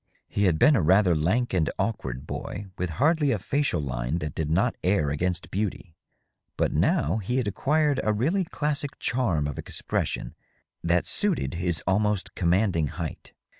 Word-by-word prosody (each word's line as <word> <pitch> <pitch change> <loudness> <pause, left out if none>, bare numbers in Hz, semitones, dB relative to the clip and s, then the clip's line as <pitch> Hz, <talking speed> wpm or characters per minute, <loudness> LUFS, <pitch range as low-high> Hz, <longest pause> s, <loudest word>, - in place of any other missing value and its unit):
He 100 - 0
had 85 -4 +3
been 150 - +6
a 115 - +3
rather 90 +2 +4
lank 100 +11 +1
and 85 -4 +2
awkward 70 - -2
boy, 100 - -5
with 90 0 -2
hardly 150 +2 +3
a 120 - +2
facial 140 - 0
line 65 +1 -2
that 75 -4 -4
did 80 -2 -2
not 100 +10 +2
err 90 -6 +2
against 90 +4 -2
beauty. 95 -3 -3 0.6
But - - +1
now 80 +9 +2
he 110 +4 -2
had 125 -5 0
acquired 145 +6 +1
a 110 - +2
really 155 - +1
classic 150 -2 -2
charm 105 - 0
of 70 - -5
expression - - -3 0.5
that 85 +1 +2
suited 205 -5 -1
his 85 -2 -1
almost 105 +1 +1
commanding 90 -2 +2
height. - - -6
95 Hz, 165 wpm, -26 LUFS, 85-125 Hz, 0.6 s, been